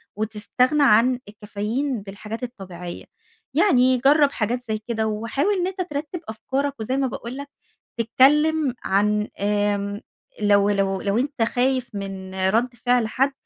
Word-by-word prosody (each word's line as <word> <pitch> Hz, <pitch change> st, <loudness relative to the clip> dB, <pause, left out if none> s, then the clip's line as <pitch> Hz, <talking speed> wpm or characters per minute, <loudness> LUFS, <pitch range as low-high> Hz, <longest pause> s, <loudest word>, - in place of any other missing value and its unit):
وتستغنى 220 Hz, +7 st, +1 dB
عن 245 Hz, 0 st, +5 dB
الكافيين 215 Hz, +5 st, -3 dB
بالحاجات 210 Hz, +4 st, -8 dB
الطبيعيّة. 185 Hz, -7 st, -7 dB, 0.5 s
يعني 255 Hz, -9 st, +4 dB
جرّب 280 Hz, +3 st, +4 dB
حاجات 240 Hz, +1 st, -1 dB
زي 215 Hz, -, 0 dB
كده 220 Hz, -2 st, -1 dB
وحاول 230 Hz, -, 0 dB
إن 360 Hz, -1 st, 0 dB
أنت 375 Hz, 0 st, -4 dB
ترتِّب 305 Hz, 0 st, -4 dB
أفكارك، 270 Hz, +6 st, -2 dB
وزي 255 Hz, +5 st, -1 dB
ما 270 Hz, -1 st, +1 dB
باقول 240 Hz, +1 st, -6 dB
لك 280 Hz, 0 st, -7 dB, 0.5 s
تتكلّم 285 Hz, +4 st, +3 dB
عن 210 Hz, +2 st, +1 dB
آمم 205 Hz, 0 st, 0 dB, 0.4 s
لو 205 Hz, 0 st, +4 dB
لو 195 Hz, -1 st, 0 dB
لو 200 Hz, +2 st, +1 dB
أنت 275 Hz, 0 st, -1 dB
خايف 255 Hz, +2 st, +1 dB
من 195 Hz, -1 st, -6 dB, 0.2 s
رد 240 Hz, +4 st, +1 dB
فعل 245 Hz, -2 st, +3 dB
حَد، 270 Hz, +5 st, +1 dB
230 Hz, 140 wpm, -23 LUFS, 205-270 Hz, 0.5 s, عن